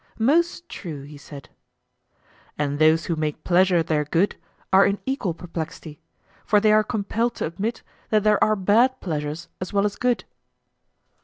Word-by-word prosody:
Most 340 +9 +1
true, 155 -7 -7
he 145 +1 -11
said. 140 0 -12 1.1
And 145 -1 -2
those 160 +1 +4
who 170 - -1
make 155 -1 -3
pleasure 180 -1 +3
their 155 -2 0
good 165 +7 +1 0.4
are 195 +1 +7
in 200 0 +2
equal 255 -11 -2
perplexity; 165 -2 -7 0.4
for 210 - +3
they 215 +1 +3
are 215 0 +5
compelled 220 +3 -1
to - - -2
admit 205 +8 -4 0.3
that 215 -2 +2
there 210 -1 +4
are 215 - +3
bad 225 +7 +3
pleasures 155 -1 -4
as 185 - -4
well 200 0 +2
as 205 - -1
good. 245 -1 0
190 Hz, 160 wpm, -23 LUFS, 155-215 Hz, 1.1 s, are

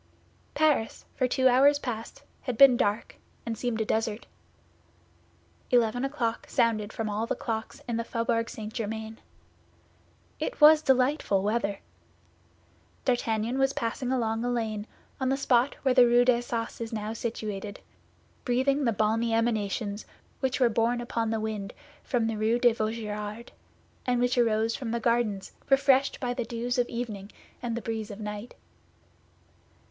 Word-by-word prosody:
Paris 290 -7 +1
for 255 - +1
two 260 +1 +3
hours 275 +3 +5
past 235 -5 -6 0.2
had 250 -4 -4
been 275 -1 +8
dark, 210 -1 -1 0.3
and 230 -1 -2
seemed 235 0 -2
a 220 - 0
desert. 220 0 -1 1.4
Eleven 245 0 +2
o'clock 270 -5 -2
sounded 215 -3 +1
from 225 -3 -3
all 215 +2 -2
the - - -1
clocks 220 -1 -5
of 235 -1 -1
the 230 - -1
Faubourg 230 0 -1
St. 215 0 -7
Germain. 220 -1 -5 1.2
It - - -3
was 305 0 +8
delightful 260 -7 +2
weather. 205 -2 -1 1.2
D'Artagnan 235 0 0
was 270 0 +2
passing 245 +2 -2
along 225 -3 0
a 245 - 0
lane 220 -3 -2 0.3
on 260 -1 0
the 270 - +1
spot 255 -1 +2
where 265 -2 +3
the 250 -1 +7
Rue 240 +1 +5
d'Assas 240 -2 0
is 230 - -4
now 215 -1 -3
situated, 210 -3 -5 0.6
breathing 275 +3 +1
the 230 - +3
balmy 225 +2 +1
emanations 215 -2 -1 0.3
which 265 0 -1
were 250 - +5
borne 230 +1 +1
upon 235 -2 -2
the 225 0 -1
wind 215 -2 -4 0.3
from 240 -4 0
the 225 -1 -2
Rue 220 +2 +2
de 240 -1 +4
Vaugirard, 215 0 -4 0.6
and 245 -1 +2
which 245 +1 +2
arose 225 -2 +2
from 255 -5 -5
the 235 +1 -1
gardens 230 -4 0 0.2
refreshed 270 0 +3
by 245 -1 -1
the 245 - -2
dews 240 +1 -2
of 245 - +1
evening 215 -4 -5 0.3
and 235 -1 -2
the 235 - -5
breeze 220 -2 -3
of 205 0 -8
night. 210 +2 -6
230 Hz, 150 wpm, -28 LUFS, 220-245 Hz, 1.4 s, been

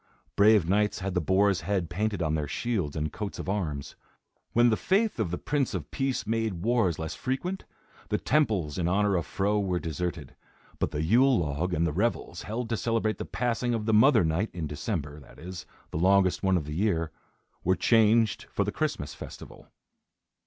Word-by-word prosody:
Brave 105 -4 +5
knights 105 +3 +2
had 95 0 -2
the 90 - +1
boar's 95 +3 +2
head 95 -4 -1
painted 105 +1 -1
on 80 -1 0
their 75 -2 -1
shields 95 -2 -2
and 75 -1 -2
coats 105 -2 -5
of - - -6
arms. 80 -9 -3 0.6
When 120 0 +4
the - - +3
faith 205 - +1
of - - 0
the 90 - -2
Prince 135 -7 -1
of 80 -5 -5
Peace 135 -1 -1
made 110 -5 -1
wars 115 -9 +2
less 80 -1 -4
frequent, 175 +9 -3 0.4
the - - +1
temples 105 - +1
in 85 - 0
honor 100 +2 +2
of 85 -4 -1
Fro 105 +2 0
were 95 -3 0
deserted, 80 -3 -4 0.4
but - - 0
the 75 - -2
yule 125 +9 +4
log 80 +3 -1
and 85 -1 +1
the 80 - -1
revels, 100 -2 -1
held 115 +3 -4
to 115 - 0
celebrate 115 -1 0
the - - -3
passing 120 0 -1
of 110 -2 -3
the 110 - +1
Mother 110 0 +6
Night, 80 +7 0
in 85 -3 -3
December, 75 0 -4
that 70 - -16
is, 90 +2 -8 0.2
the - - -3
longest 95 +1 +3
one 95 -1 +3
of 80 - -3
the 75 - -5
year, 85 -3 0 0.5
were 95 +2 +3
changed 110 -1 +3
for - - 0
the - - -2
Christmas - - -2
festival. - - -11
95 Hz, 195 wpm, -28 LUFS, 85-115 Hz, 0.6 s, Mother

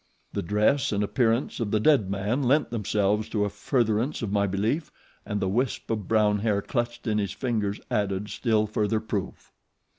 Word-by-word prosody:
The - - -1
dress 105 +9 +2
and 105 0 +1
appearance 115 +3 +1
of 115 -3 -1
the 110 - +2
dead 120 -5 +3
man 100 +7 -1
lent 140 +4 +2
themselves 105 -1 0
to 105 -2 0
a 100 - -3
furtherance 115 +4 0
of 105 - -2
my 100 0 +2
belief 110 - -1 0.4
and 105 0 -1
the 95 - 0
wisp 120 +5 -1
of 105 -5 -2
brown 105 -2 +3
hair 105 -1 +1
clutched 120 +2 -3
in 105 -2 +1
his 100 -3 -2
fingers 110 -6 -1
added 100 0 -1
still 110 -1 +1
further 110 +1 0
proof." 105 -3 -5
105 Hz, 180 wpm, -26 LUFS, 100-120 Hz, 0.4 s, dead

